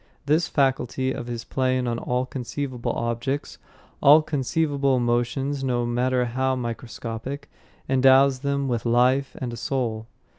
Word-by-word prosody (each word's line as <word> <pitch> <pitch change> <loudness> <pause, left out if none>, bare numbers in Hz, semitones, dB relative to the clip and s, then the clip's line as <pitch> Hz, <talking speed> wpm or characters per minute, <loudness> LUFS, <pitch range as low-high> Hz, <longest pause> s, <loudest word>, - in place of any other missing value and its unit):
This 155 +4 +2
faculty 130 -2 0
of 120 -2 -5
his 120 -1 -5
playing 130 -1 0
on 120 -1 -1
all 125 +1 -1
conceivable 130 0 -4
objects, 120 +4 -3 0.4
all 150 +3 +7
conceivable 140 -2 0
emotions, 120 +4 0
no 120 -2 0
matter 125 +1 +1
how 130 +2 0
microscopic, 120 +2 -6 0.4
endows 135 0 +5
them 140 0 -1
with 120 -3 -1
life 125 +3 +2
and 120 -2 -4
a - - -6
soul. 115 -3 -2
130 Hz, 135 wpm, -24 LUFS, 120-135 Hz, 0.4 s, all